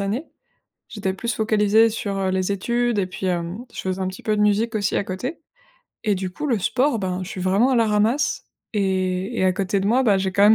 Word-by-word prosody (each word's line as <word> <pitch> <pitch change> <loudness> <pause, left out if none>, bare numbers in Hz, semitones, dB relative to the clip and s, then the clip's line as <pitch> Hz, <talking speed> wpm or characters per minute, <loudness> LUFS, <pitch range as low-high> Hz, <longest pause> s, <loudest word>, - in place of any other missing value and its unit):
années. 210 +10 -2 0.6
J'étais 195 -3 -2
plus 235 +5 -3
focalisée 220 +1 +3
sur, 205 -2 -3
heu, 190 -1 0
les 185 +1 0
études 235 +3 0
et 185 - 0
puis, 185 +1 -4
hem, 175 +3 -2
je - - -7
faisais 190 0 -2
un 185 - 0
petit 185 - -7
peu 215 - +1
de 210 - +1
musique 215 +2 +2
aussi 205 -1 0
à - - 0
côté. 245 - -4 0.6
Et 210 -3 +1
du 185 0 -3
coup, 300 +11 -5
le 240 -6 +1
sport, 255 +5 +1
ben, 185 -1 -2
je 185 - -6
suis 185 - -6
vraiment 195 +8 +3
à 255 - +3
la 230 -1 +4
ramasse. 215 +6 +1 0.3
Et 190 +1 0
et - - +2
à 185 - +4
côté 195 +2 0
de 195 - -1
moi, 250 +5 +3
bah, 205 -5 +3
j'ai 190 0 -1
quand 200 - +2
même 210 +2 +8
200 Hz, 245 wpm, -22 LUFS, 190-225 Hz, 0.6 s, même